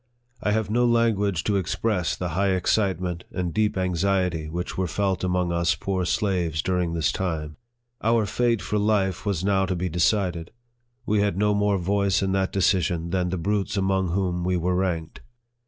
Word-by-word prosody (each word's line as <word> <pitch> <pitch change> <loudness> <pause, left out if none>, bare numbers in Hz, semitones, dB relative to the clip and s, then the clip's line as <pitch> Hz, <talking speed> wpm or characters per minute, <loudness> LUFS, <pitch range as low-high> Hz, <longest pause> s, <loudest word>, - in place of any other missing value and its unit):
I - - 0
have 110 0 0
no 120 +2 +2
language 105 -6 +2
to 105 -2 +1
express 95 0 -1
the 90 - -3
high 95 +3 +1
excitement 90 -2 0
and 90 -2 -3
deep 105 -2 +1
anxiety 90 -3 0
which 90 +3 -4
were 95 -1 -1
felt 95 +2 -1
among 90 -1 0
us 85 -4 +1
poor 95 +3 -2
slaves 90 -6 0
during 90 -2 0
this 80 -2 +1
time. 80 -6 -3 0.4
Our 115 -1 +2
fate 115 -2 0
for 105 +3 -1
life 100 -2 0
was 95 -4 -1
now 95 -1 +2
to 95 - -1
be 90 +1 -2
decided. 90 -1 0 0.6
We 105 -1 +1
had 100 -3 +1
no 105 +1 +2
more 105 -1 +2
voice 100 +1 +1
in 95 - 0
that 95 0 0
decision 90 -3 +1
than 90 -1 0
the 95 - -2
brutes 100 +3 -1
among 95 -1 +1
whom 90 -1 -1
we 90 0 +1
were 90 +2 0
ranked. 90 -3 -2
95 Hz, 180 wpm, -25 LUFS, 90-100 Hz, 0.6 s, no